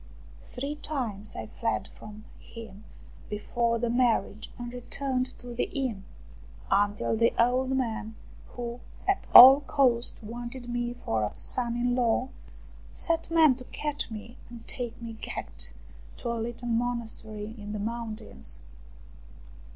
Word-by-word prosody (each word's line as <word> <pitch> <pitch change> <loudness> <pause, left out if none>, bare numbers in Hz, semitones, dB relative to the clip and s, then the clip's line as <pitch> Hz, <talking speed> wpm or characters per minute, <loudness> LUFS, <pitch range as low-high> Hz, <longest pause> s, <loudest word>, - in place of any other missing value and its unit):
Three 280 +4 -2
times 230 -10 -3
I 110 - -4
fled 110 0 -2
from 215 +1 -12
him 220 -3 -11 0.4
before 230 +3 0
the 230 0 0
marriage, 230 -4 +1
and 240 -1 -6
returned 255 +1 -2
to 245 0 -8
the 235 - 0
inn, 240 -8 -3 0.7
until 205 +2 +2
the 230 +1 +3
old 250 +2 +3
man, 225 -3 -2 0.3
who 240 0 -6 0.3
at 390 0 +1
all 265 +3 +13
cost 255 -5 +2
wanted 240 +3 -6
me 240 0 -2
for 110 -1 +1
a 105 - -2
son 240 -2 +1
in 245 +1 +1
law, 250 +1 +2 0.6
set 330 -1 -1
men 320 -4 +6
to 255 - -8
catch 295 0 -3
me 220 +2 -9
and 235 -1 -11
take 240 -2 -5
me 230 -1 -6
gagged - - -3 0.5
to 240 - -3
a - - -1
little 240 +1 -5
monastery 225 -2 -2
in 210 -2 -8
the 210 - -3
mountains. 220 - -5
235 Hz, 135 wpm, -28 LUFS, 220-250 Hz, 0.7 s, all